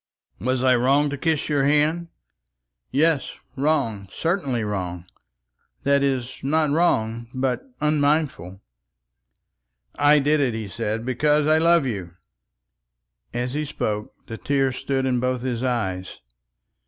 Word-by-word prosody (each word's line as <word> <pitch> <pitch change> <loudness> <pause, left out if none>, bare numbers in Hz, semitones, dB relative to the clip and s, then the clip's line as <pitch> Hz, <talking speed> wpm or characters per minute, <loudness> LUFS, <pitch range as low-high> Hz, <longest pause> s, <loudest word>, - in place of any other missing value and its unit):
"Was 130 +1 -1
I 130 -1 +5
wrong 140 +4 +3
to - - -2
kiss 160 -1 0
your 145 -3 +1
hand?" 150 +4 +2 0.8
"Yes, 150 +1 +1 0.2
wrong, 135 -9 0
certainly 145 - -1
wrong; 90 -4 -4 0.8
that 140 0 +3
is, 130 -2 -1
not 150 +2 +1
wrong, 115 -8 +1
but 130 - -2
unmindful." 145 - 0 1.4
"I 145 +1 +6
did 150 +2 +2
it," 130 -5 +1
he 110 -2 -4
said, 115 +2 -3
"because 150 +4 +2
I 155 +1 +4
love 170 -2 +4
you." 95 -9 -4 1.2
And 120 +1 -2
as 125 +1 -4
he 150 +1 -1
spoke 105 -7 -3
the 115 - -8
tears 135 -2 0
stood 135 -1 -1
in 125 -2 +1
both 125 0 -1
his 125 -3 -2
eyes. 95 -8 -2
130 Hz, 130 wpm, -23 LUFS, 115-150 Hz, 1.4 s, I